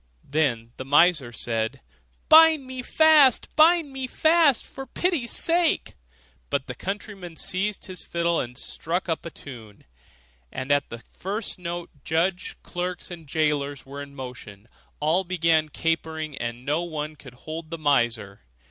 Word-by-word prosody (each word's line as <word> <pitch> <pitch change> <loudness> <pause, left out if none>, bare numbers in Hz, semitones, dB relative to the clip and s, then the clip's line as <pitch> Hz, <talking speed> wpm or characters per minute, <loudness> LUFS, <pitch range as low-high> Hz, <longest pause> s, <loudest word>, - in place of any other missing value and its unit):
Then 130 -6 0
the - - -5
miser 145 -2 +4
said, 115 -1 -2 0.5
'Bind 315 -3 +7
me 255 0 -6
fast, 305 -1 +4
bind 320 -2 +5
me 265 -1 -3
fast, 315 -1 +3
for 270 0 -9
pity's 315 -4 -1
sake.' 335 -1 +2 0.6
But 140 -2 -1
the - - -6
countryman 195 -3 -6
seized 195 +5 -2
his 185 -1 -8
fiddle, 170 0 0
and 125 0 -5
struck 170 +6 -3
up 165 0 -2
a - - -5
tune, 115 -10 -12 0.7
and 130 +2 -4
at 145 0 +2
the 120 -1 -9
first 200 +1 -4
note 175 -1 -5
judge, 175 +3 -1
clerks, 180 +1 -5
and 165 -3 -9
jailer 145 -2 0
were 140 +1 -8
in 140 0 -10
motion; 125 -6 -9 0.3
all 160 +5 +2
began 165 -3 +1
capering, 160 -1 -2
and 120 -1 -5
no 150 +4 +1
one 155 -3 -4
could 135 -4 -14
hold 155 +4 -7
the 165 - -5
miser. 120 -9 0
165 Hz, 150 wpm, -25 LUFS, 140-195 Hz, 0.7 s, Bind